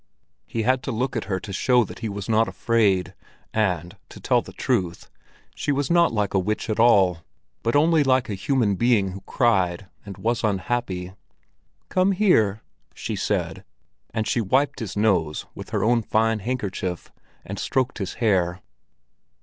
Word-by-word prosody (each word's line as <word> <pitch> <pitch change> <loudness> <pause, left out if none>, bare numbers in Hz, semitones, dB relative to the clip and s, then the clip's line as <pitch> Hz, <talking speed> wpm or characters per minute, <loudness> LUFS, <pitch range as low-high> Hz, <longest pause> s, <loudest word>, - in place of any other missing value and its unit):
He 115 - -2
had 130 +2 +2
to 135 - -4
look 125 +3 -2
at 115 - -2
her 95 -2 -2
to 100 +1 -8
show 125 +5 +3
that - - -9
he 110 - -3
was 100 -1 -5
not 115 0 +3
afraid, 100 -6 +1 0.4
and 90 -6 0
to - - -12
tell - - +2
the - - -12
truth, 95 -9 -2 0.4
she - - -2
was 145 +2 0
not 170 0 +4
like 105 -3 -1
a 95 - +3
witch 105 +4 -2
at 110 - -2
all, 95 -7 +5 0.4
but 115 +3 0
only 155 +1 +4
like 130 -2 +2
a 105 - -3
human 110 +1 +1
being 110 -1 +2
who 95 +1 -8
cried 95 -6 +1 0.2
and 100 -2 -9
was 115 +4 -1
unhappy. 95 -2 -2 0.8
"Come 185 +1 +2
here!" 115 - +2 0.3
she - - -4
said, - - -2 0.5
and 110 -1 -2
she 120 - +1
wiped 135 +7 +1
his 105 -4 -5
nose 95 -8 +1
with - - -9
her - - -1
own 115 +2 +3
fine 110 +1 +1
handkerchief, 100 -6 -4 0.3
and - - -6
stroked 130 -2 -1
his 95 -3 -4
hair. 90 -6 +1
110 Hz, 170 wpm, -24 LUFS, 95-125 Hz, 0.8 s, all